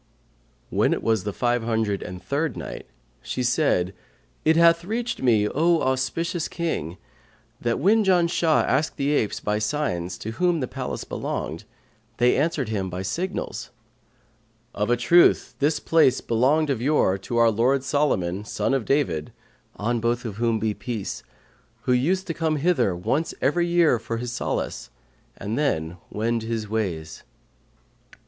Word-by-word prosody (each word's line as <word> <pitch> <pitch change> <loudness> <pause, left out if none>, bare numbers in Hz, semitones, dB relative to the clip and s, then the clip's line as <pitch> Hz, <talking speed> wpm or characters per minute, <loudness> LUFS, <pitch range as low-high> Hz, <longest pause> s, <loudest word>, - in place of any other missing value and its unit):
When - - +2
it - - -3
was 110 -4 +1
the 105 - -1
Five 120 +3 0
Hundred 110 -3 -1
and 90 0 -8
Third 145 -1 -1
Night, - - -7 0.3
She 125 - -3
said, 125 - +1 0.5
It 160 +1 +4
hath 170 0 +5
reached 230 +6 -3
me, 110 -5 +3
O 165 +7 +2
auspicious 135 +6 -1
King, 95 - -3 0.6
that 120 -1 0
when 215 +4 +4
Janshah 170 -4 +3
asked 150 +4 0
the 140 +1 0
apes 110 -8 0
by 105 0 -1
signs 95 - -2
to 110 - -5
whom 175 +6 +1
the 130 - -2
palace - - -5
belonged, - - -4 0.5
they 120 0 +4
answered 145 -5 0
him 100 -4 -2
by 90 +1 -4
signals, 175 - -4 1.0
"'Of 105 +2 -1
a 120 - +3
truth 170 +9 +4
this 150 +2 +2
place 160 -6 +3
belonged 140 +6 +2
of 125 -4 -2
yore 125 -9 +2
to 120 +5 -4
our 115 -1 +5
lord 130 +5 +2
Solomon, 105 -11 0
son 105 - -1
of 135 -5 0
David 90 - 0 0.4
(on 115 +3 -1
both 120 +2 -1
of 105 -3 -5
whom 115 -1 +1
be 110 -1 -1
peace!), 110 -3 -5 0.6
who 125 - +2
used 175 +10 +1
to 165 - -3
come 160 -1 0
hither 140 - +1
once 135 - -1
every 170 +6 +1
year 170 -8 +3
for 115 0 -4
his 120 +1 -4
solace, 115 - -3 0.5
and 105 +5 -3
then 85 - -1
wend 115 +2 -1
his 110 -1 -3
ways.' 90 -8 -3
125 Hz, 155 wpm, -24 LUFS, 105-155 Hz, 1.0 s, hath